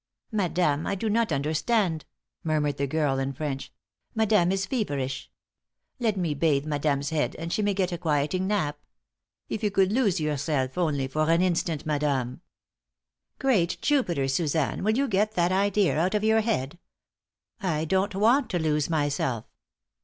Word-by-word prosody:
"Madame, 175 -7 0
I - - 0
do 215 +2 -2
not 230 -1 +1
understand," 160 +4 0 0.4
murmured 150 -3 0
the 140 - -1
girl, 145 -2 0
in 135 0 -2
French. 135 -1 -4 0.4
"Madame 210 -5 +3
is 195 0 0
feverish. 140 - -3 0.7
Let 220 -4 0
me 170 -5 0
bathe 145 -1 +1
madame's 145 -1 -1
head, 155 -2 0
and 165 +1 -4
she 215 - 0
may 205 -1 +1
get 185 -2 0
a 175 - -4
quieting 160 +3 0
nap. 155 -8 -1 0.7
If - - -4
you 210 - +1
could 195 -1 +2
lose 210 -6 +2
yourself 145 -3 -1
only 150 -7 0
for 155 +4 0
an 165 +2 +4
instant, 170 -3 0
madame!" 140 -5 -1 1.0
"Great 210 -11 +1
Jupiter, 175 - +1
Suzanne, 150 +3 0
will 215 +3 +2
you 280 +1 +2
get 210 0 +1
that 175 -2 +2
idea 200 -3 +2
out 185 +5 +1
of 210 - 0
your 220 0 +4
head? 175 - -2 0.8
I 160 -5 0
don't 190 +4 0
want 235 +7 +3
to 180 - 0
lose 150 -2 0
myself. 145 -7 -1
165 Hz, 160 wpm, -26 LUFS, 145-200 Hz, 1.0 s, an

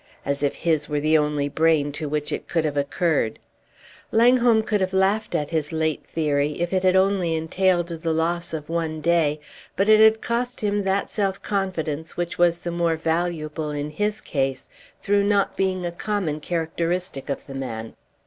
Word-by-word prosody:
As 140 0 -1
if 145 - 0
his 155 -3 0
were 150 -1 0
the 155 +2 +2
only 150 -2 +1
brain 155 -1 +2
to 150 +1 -5
which 150 0 -2
it - - -4
could 165 -2 0
have 150 -2 -1
occurred! 145 -4 0 0.7
Langholm 235 -1 +4
could 210 -2 0
have 190 0 -1
laughed 195 +3 +1
at 150 0 -1
his 155 -3 0
late 160 -1 -1
theory 150 -1 0
if 175 +2 -1
it 185 - +2
had 185 0 +3
only 190 -3 +2
entailed 175 +2 +1
the 165 0 -3
loss 170 +2 -1
of 155 -2 -5
one 165 -1 -2
day, 155 -2 +2 0.4
but 195 - +1
it 215 0 +7
had 220 0 +8
also 220 - -18
cost 245 +2 -2
him 205 -1 0
that 195 +1 0
self 195 -2 -1
confidence 165 -6 -3
which 175 0 -3
was 175 -1 +4
the 175 0 -5
more 170 -1 +1
valuable 160 -1 -2
in 145 0 -4
his 210 +7 -2
case 135 -2 -2 0.4
through 205 -1 +3
not 200 -1 +1
being 185 -2 0
a 175 - -2
common 175 -4 -2
characteristic 165 -1 -2
of 140 - -3
the 135 - -9
man. 115 -4 -5
165 Hz, 185 wpm, -23 LUFS, 150-190 Hz, 0.7 s, had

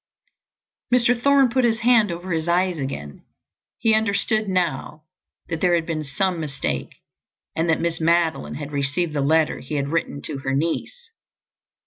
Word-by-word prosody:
Mr. 245 0 +4
Thorne 280 -1 +5
put 255 +2 +1
his 225 -1 +1
hand 230 -4 +4
over 175 +2 -6
his 160 0 -1
eyes 180 -1 +1
again. 75 - -6 0.5
He 225 0 +2
understood 215 0 +1
now 160 -4 -2 0.4
that 165 -2 -4
there 180 -1 +4
had 165 -1 0
been 160 -2 -3
some 175 +5 -1
mistake 135 - -3 0.6
and 165 +1 0
that 160 - +2
Miss 165 -1 -2
Madeline 165 0 +1
had 145 0 -6
received 145 +4 -1
the 145 - 0
letter 155 +2 +2
he 140 +4 -6
had 140 -1 -1
written 160 -2 -2
to 145 -3 -5
her 135 0 -2
niece. 455 - -3
170 Hz, 160 wpm, -23 LUFS, 150-200 Hz, 0.6 s, Thorne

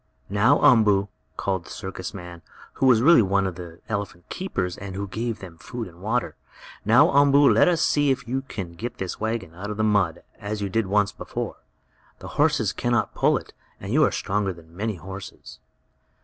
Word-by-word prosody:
"Now, 115 +8 +4
Umboo!" 105 -7 +5 0.3
called 95 -3 -1
the - - -13
circus 95 -1 -6
man, 90 -3 -9 0.3
who 135 - +1
was 120 -2 +5
really 165 -3 +7
one 100 -1 +1
of 95 - -2
the 85 -1 -10
elephant 100 -5 -4
keepers, 90 - -3
and 95 -1 -8
who 100 +1 -3
gave 115 +4 -3
them 85 -4 -12
food 120 +4 -6
and 85 0 -16
water, 115 +4 -1 0.5
"now, 130 - +5
Umboo, 140 0 +6
let - - +5
us 170 -2 +2
see 145 -1 +2
if 130 -2 -1
you 130 +3 -1
can 95 -10 -7
get 120 +7 -6
this 95 -2 -5
wagon 110 -6 -3
out 95 +5 -7
of 105 - -4
the 110 - +1
mud, 100 -6 +1 0.2
as 105 0 -4
you 100 -1 -2
did 110 +1 0
once 105 +1 +2
before. - - -5 0.6
The - - -9
horses - - +1
can - - -1
not - - +1
pull - - +3
it, - - -10 0.3
but - - -6
you - - +4
are - - +3
stronger 100 0 -1
than 85 -1 -17
many 105 +2 -2
horses." 95 +3 -10
100 Hz, 200 wpm, -24 LUFS, 95-115 Hz, 0.6 s, really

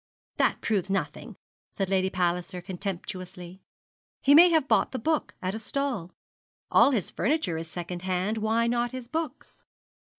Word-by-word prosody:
'That - - +2
proves 195 -4 0
nothing,' 195 0 -3 0.3
said 195 - -2
Lady 190 0 +1
Palliser, 180 0 -1
contemptuously. 185 -1 -6 0.6
'He 280 - +6
may 340 +4 +9
have 320 -4 +2
bought - - +2
the - - -1
book 310 +6 -1
at 185 +1 -1
a 220 - -4
stall. 235 -7 -3 0.6
All - - +7
his 230 -10 -1
furniture 240 - 0
is 165 0 -6
second 175 +1 -5
hand, 190 +4 -1
why 220 +2 +1
not 240 +1 0
his 255 -2 -6
books?' 315 0 -5
195 Hz, 155 wpm, -27 LUFS, 180-255 Hz, 0.6 s, may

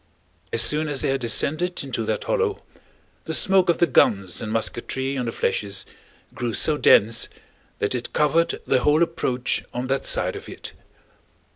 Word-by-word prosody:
As 115 - +5
soon 155 +5 +5
as 145 -3 -1
they - - 0
had 135 0 -1
descended 155 +9 0
into - - -4
that - - -3
hollow, 455 -4 -2 0.6
the - - -1
smoke 190 -2 +4
of 170 - +2
the 175 - +3
guns 100 - +1
and 110 - -5
musketry 130 +4 -3
on 125 -2 -3
the - - -2
flèches 100 -3 -2 0.5
grew 120 -3 -4
so 155 - +4
dense 115 -5 +3 0.5
that 100 - -2
it 125 -1 -5
covered 160 +3 +1
the 130 - +2
whole 150 +5 +2
approach 130 -7 -2
on 125 +1 -3
that 135 0 -1
side - - +1
of - - -10
it. - - -9
135 Hz, 170 wpm, -22 LUFS, 115-160 Hz, 0.6 s, As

